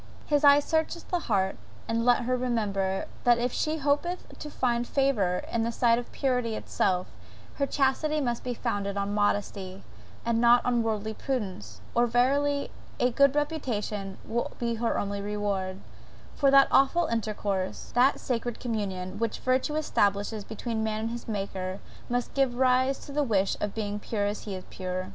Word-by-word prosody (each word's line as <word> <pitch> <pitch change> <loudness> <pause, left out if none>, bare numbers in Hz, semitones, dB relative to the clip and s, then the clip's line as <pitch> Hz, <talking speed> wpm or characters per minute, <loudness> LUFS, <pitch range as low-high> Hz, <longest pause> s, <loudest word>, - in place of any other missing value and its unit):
His 295 -1 +1
eye 285 0 +8
searcheth 320 +3 -1
the 355 - +2
heart; 195 - 0 0.3
and 230 0 0
let 245 0 +4
her 255 +2 +1
remember, 205 -6 -1 0.2
that 240 -1 +5
if 240 +1 0
she 310 +1 0
hopeth 295 +5 0
to 300 - -6
find 240 -4 0
favour 220 -10 +1
in 230 - +1
the 230 +1 0
sight 235 0 +3
of 245 - -8
purity 250 -4 0
itself, 185 -3 0 0.5
her 280 - +1
chastity 290 +3 +1
must 240 -4 -1
be 245 -1 -3
founded 200 -4 -2
on 200 0 -1
modesty, 200 -2 -1 0.4
and 230 0 +1
not 240 0 +5
on 245 -1 +2
worldly 220 -1 -2
prudence; 215 -8 -4
or 240 +1 +3
verily 280 +4 +2 0.3
a 250 - +3
good 280 +3 +4
reputation 220 -10 -2
will 235 +2 -1
be 235 -1 -1
her 230 0 0
only 200 0 -2
reward; 200 -2 -2 0.5
for 280 - +3
that 275 0 +7
awful 275 +6 +4
intercourse, 205 -6 -2
that 255 +3 +4
sacred 240 -2 -2
communion, 200 -5 -3
which 230 -1 -1
virtue 260 +4 0
establishes 205 -7 +1
between 220 +1 -3
man 215 0 -1
and 225 - -2
his 235 0 -6
Maker, 195 -3 -3 0.3
must 245 0 -1
give 270 -3 +1
rise 260 +1 +3
to - - -9
the 295 +1 +1
wish 200 -8 +1
of 205 -1 -2
being 210 -2 -2
pure 210 -1 -2
as 205 +1 -3
he 200 -3 -4
is 185 - -7
pure! 185 0 -4
235 Hz, 170 wpm, -28 LUFS, 205-265 Hz, 0.5 s, eye